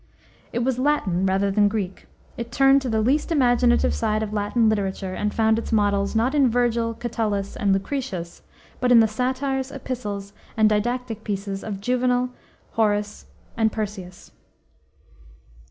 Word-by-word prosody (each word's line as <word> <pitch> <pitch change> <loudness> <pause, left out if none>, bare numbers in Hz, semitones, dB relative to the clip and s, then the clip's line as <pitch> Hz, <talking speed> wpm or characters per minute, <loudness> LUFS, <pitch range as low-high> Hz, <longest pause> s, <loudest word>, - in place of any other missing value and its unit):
It 240 - -1
was 255 0 0
Latin 200 -10 +1
rather 195 +1 +1
than 205 +1 +4
Greek; 200 -3 -4 0.3
it 235 0 -6
turned 270 +2 +5
to 260 - -3
the 220 -1 +1
least 290 +8 +1
imaginative 245 -4 +3
side 215 -1 0
of 215 -1 -5
Latin 215 +2 +1
literature 195 -3 -1
and 210 +2 -1
found 220 0 +2
its - - -6
models, 205 -1 +1
not 235 +5 +2
in 280 -4 +4
Vergil, 235 -1 0
Catullus, 215 -4 -2
and 205 -4 +1
Lucretius, 195 -3 -3 0.4
but 250 0 +1
in 240 - +8
the 225 - +5
satires, 260 +4 -2
epistles, 210 -7 -5 0.2
and 220 -1 +5
didactic 225 +1 -1
pieces 200 -1 -4
of 200 -3 -5
Juvenal, 250 +2 +1 0.4
Horace, 210 -2 -1 0.3
and 220 -1 +2
Persius. 200 -5 -6
220 Hz, 150 wpm, -23 LUFS, 205-250 Hz, 0.4 s, in